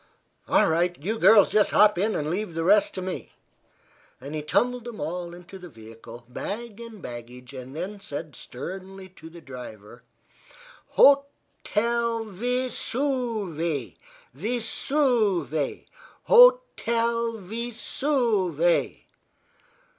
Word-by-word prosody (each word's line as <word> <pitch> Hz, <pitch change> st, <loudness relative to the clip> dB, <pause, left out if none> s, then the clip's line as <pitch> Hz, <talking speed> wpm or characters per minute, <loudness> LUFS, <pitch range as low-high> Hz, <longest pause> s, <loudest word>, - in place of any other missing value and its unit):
"All -, -, +4 dB
right; 175 Hz, +2 st, +1 dB
you 215 Hz, +9 st, -3 dB
girls 215 Hz, -2 st, +6 dB
just 210 Hz, -1 st, +3 dB
hop 210 Hz, 0 st, +5 dB
in, 205 Hz, +5 st, 0 dB
and 150 Hz, +1 st, -2 dB
leave 185 Hz, -2 st, -3 dB
the 165 Hz, -, -1 dB
rest 205 Hz, +4 st, +3 dB
to 185 Hz, -, -4 dB
me." 185 Hz, 0 st, -6 dB, 0.9 s
He 150 Hz, +2 st, -5 dB
tumbled 240 Hz, +10 st, 0 dB
them 240 Hz, -3 st, -8 dB
all 170 Hz, +3 st, -4 dB
into 180 Hz, +2 st, -12 dB
the 180 Hz, -1 st, -11 dB
vehicle, 115 Hz, 0 st, -13 dB
bag 210 Hz, -, -6 dB
and 225 Hz, -5 st, -11 dB
baggage, 125 Hz, +2 st, -9 dB
and 130 Hz, +1 st, -9 dB
then 200 Hz, +5 st, -5 dB
said 155 Hz, -6 st, -7 dB
sternly 190 Hz, +7 st, -8 dB
to 160 Hz, -3 st, -13 dB
the 170 Hz, +1 st, -13 dB
driver: 120 Hz, -5 st, -11 dB, 1.0 s
"Ho 280 Hz, 0 st, +7 dB, 0.4 s
tel 235 Hz, +1 st, 0 dB
Ve 245 Hz, +6 st, -2 dB
suve 215 Hz, -, -2 dB, 0.4 s
Ve 215 Hz, -, -2 dB
suve 215 Hz, -, 0 dB, 0.4 s
ho -, -, +8 dB
tel 230 Hz, 0 st, 0 dB
Ve 225 Hz, +5 st, -5 dB
suve! 215 Hz, -, +1 dB
195 Hz, 120 wpm, -25 LUFS, 160-230 Hz, 1.0 s, ho